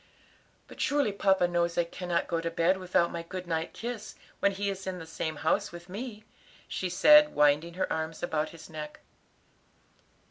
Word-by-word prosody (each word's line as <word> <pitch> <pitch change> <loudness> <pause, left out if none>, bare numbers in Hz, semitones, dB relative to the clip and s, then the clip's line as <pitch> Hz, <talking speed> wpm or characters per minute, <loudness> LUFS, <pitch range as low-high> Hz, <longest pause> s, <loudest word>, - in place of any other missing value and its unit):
"But - - -9
surely 285 -6 +2
papa 190 -2 +3
knows 170 -1 0
I 175 - +4
cannot 170 0 -2
go 165 -1 -1
to 165 - -2
bed 170 +3 +2
without 180 -2 +1
my 170 - -4
good 185 +2 -7
night 165 -1 -2
kiss 235 -2 -6 0.2
when 200 - +3
he 200 +1 -2
is 195 -1 -4
in 185 -1 -3
the 165 - -8
same 160 -1 -4
house 160 +2 0
with 175 +1 -11
me," 215 +2 -6 0.4
she 185 - -3
said, 300 +11 +6
winding 150 +3 +3
her 185 - -1
arms 160 +1 -4
about 155 -3 0
his 160 -2 -12
neck. 150 -1 -8
175 Hz, 180 wpm, -29 LUFS, 165-195 Hz, 0.4 s, said